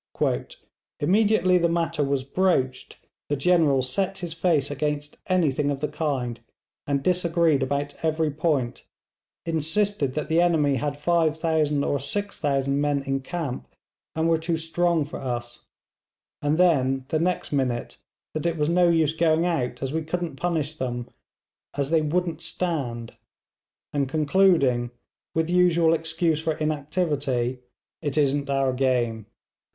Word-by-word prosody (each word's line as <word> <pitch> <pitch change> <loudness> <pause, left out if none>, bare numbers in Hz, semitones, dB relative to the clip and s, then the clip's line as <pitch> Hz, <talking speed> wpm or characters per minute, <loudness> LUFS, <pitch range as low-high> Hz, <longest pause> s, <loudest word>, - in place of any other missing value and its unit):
'Immediately 185 +1 +3
the 170 0 +2
matter 165 -2 0
was 140 -1 0
broached, 135 -4 0 0.3
the 145 - +1
General 145 -3 +3
set 190 +9 -1
his 175 -3 -5
face 165 -5 +1
against 150 +1 -2
anything 150 -6 +1
of 140 -1 -2
the 150 - -1
kind, 140 -6 -2 0.5
and 140 -1 0
disagreed 170 -4 +2
about 140 +2 -1
every 160 -1 +1
point 140 -5 -1 0.6
insisted 160 -1 0
that 150 - -2
the 165 +2 +3
enemy 155 -6 +3
had 145 +3 -2
5000 160 -2 +1
or 140 - 0
6000 140 -5 -1
men 145 -1 0
in 135 0 -1
camp, 145 -2 -5 0.5
and 160 +1 +1
were 165 -1 +3
too 165 0 -1
strong 165 0 +1
for 145 - -7
us; 120 -2 -5 0.7
and 145 +2 +1
then, 135 -7 +3
the 155 - +1
next 180 +2 -1
minute, 125 -4 -1 0.4
that 155 +2 -1
it 170 -1 -1
was 150 0 +1
no 175 0 +4
use 160 -2 +2
going 165 0 +2
out 150 -8 -1
as 135 +1 -3
we 160 - 0
couldn't 170 -1 -3
punish 155 -1 -2
them, 120 -3 -3 0.7
as 140 +1 -1
they 165 -1 +4
wouldn't 165 +1 -1
stand; 140 -10 -3 0.8
and 140 -2 0
concluding 150 -6 +3 0.5
with 160 0 +1
usual 170 -2 +4
excuse 160 0 0
for 160 0 0
inactivity, 145 -5 -1 0.4
"It 145 -2 -3
isn't 140 -1 +1
our 135 -1 +1
game." 120 -4 0
155 Hz, 140 wpm, -25 LUFS, 135-170 Hz, 0.8 s, no